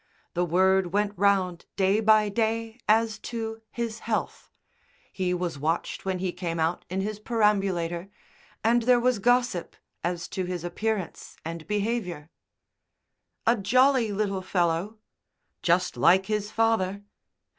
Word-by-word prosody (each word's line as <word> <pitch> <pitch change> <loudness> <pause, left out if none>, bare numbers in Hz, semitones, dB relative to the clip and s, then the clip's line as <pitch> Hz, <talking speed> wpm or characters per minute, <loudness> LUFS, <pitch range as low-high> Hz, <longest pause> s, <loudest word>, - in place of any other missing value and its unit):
The 175 - +1
word 185 +1 +2
went 205 0 +1
round 190 -3 +1
day 195 +2 +3
by 215 -1 +5
day 225 +2 -1
as 220 0 +3
to 225 -1 -5
his 230 -2 -4
health; 225 -2 -3 0.6
he 185 -2 -1
was 175 -4 -2
watched 160 +6 -2
when 190 -1 -1
he 180 0 -2
came 175 -2 -4
out 160 +2 0
in 190 +2 -1
his 210 +1 -4
perambulator, 195 -6 0 0.5
and 235 +2 +4
there 245 +1 +4
was 245 -2 +2
gossip 245 -4 +1 0.3
as 175 -1 -2
to 185 - -3
his 180 -2 -4
appearance 195 +1 -3
and 165 -1 -6
behaviour. 205 -7 -2 1.1
"A 230 - +5
jolly 255 +2 +3
little 200 -2 -1
fellow." 180 +3 0 0.6
"Just 180 +1 +2
like 190 +2 +4
his 210 0 -2
father." 215 -3 +1
200 Hz, 135 wpm, -26 LUFS, 180-225 Hz, 1.1 s, by